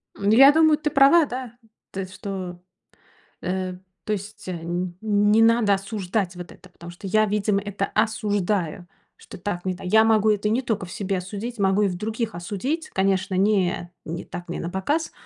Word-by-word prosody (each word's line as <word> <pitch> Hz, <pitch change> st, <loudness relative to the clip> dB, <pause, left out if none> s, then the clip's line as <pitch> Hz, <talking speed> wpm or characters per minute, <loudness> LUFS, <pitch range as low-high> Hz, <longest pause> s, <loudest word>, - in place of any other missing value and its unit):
Ну 200 Hz, +1 st, 0 dB
я 270 Hz, +5 st, +9 dB
думаю, 315 Hz, 0 st, +4 dB
ты 305 Hz, 0 st, -1 dB
права, 280 Hz, +4 st, +6 dB
да. 250 Hz, -3 st, -7 dB, 0.3 s
То 195 Hz, -, -6 dB
есть 185 Hz, 0 st, -8 dB
что 185 Hz, -4 st, -6 dB, 0.8 s
Э, 185 Hz, 0 st, -2 dB, 0.3 s
то 215 Hz, -, -1 dB
есть 205 Hz, 0 st, -7 dB
н 175 Hz, 0 st, -4 dB
не 210 Hz, 0 st, +3 dB
надо 225 Hz, -2 st, +4 dB
осуждать 195 Hz, -1 st, -2 dB
вот 175 Hz, -1 st, -9 dB
это, 185 Hz, -, -16 dB
потому 175 Hz, -1 st, -11 dB
что 175 Hz, +3 st, -9 dB
я, 215 Hz, +3 st, +3 dB
видимо, 210 Hz, -1 st, +1 dB
это 200 Hz, -1 st, -3 dB
осуждаю, 205 Hz, -6 st, -1 dB, 0.3 s
что -, -, -13 dB
так 175 Hz, -1 st, -4 dB
не 185 Hz, -, 0 dB
та 185 Hz, -, -12 dB
Я 215 Hz, +4 st, +5 dB
могу 220 Hz, -1 st, +3 dB
это 210 Hz, 0 st, +1 dB
не 230 Hz, +4 st, +1 dB
только 220 Hz, -6 st, -2 dB
в 175 Hz, -, -11 dB
себе 195 Hz, -3 st, -2 dB
осудить, 205 Hz, +6 st, -6 dB
могу 195 Hz, 0 st, +2 dB
и -, -, +3 dB
в 180 Hz, -, -3 dB
других 220 Hz, +2 st, -3 dB
осудить. 230 Hz, -, -3 dB
Конечно, 190 Hz, 0 st, 0 dB
не 185 Hz, -3 st, +1 dB
не 165 Hz, +2 st, -5 dB
так, 175 Hz, -, -8 dB
не 175 Hz, -, -5 dB
напоказ, 190 Hz, -, -2 dB
200 Hz, 185 wpm, -24 LUFS, 185-220 Hz, 0.8 s, я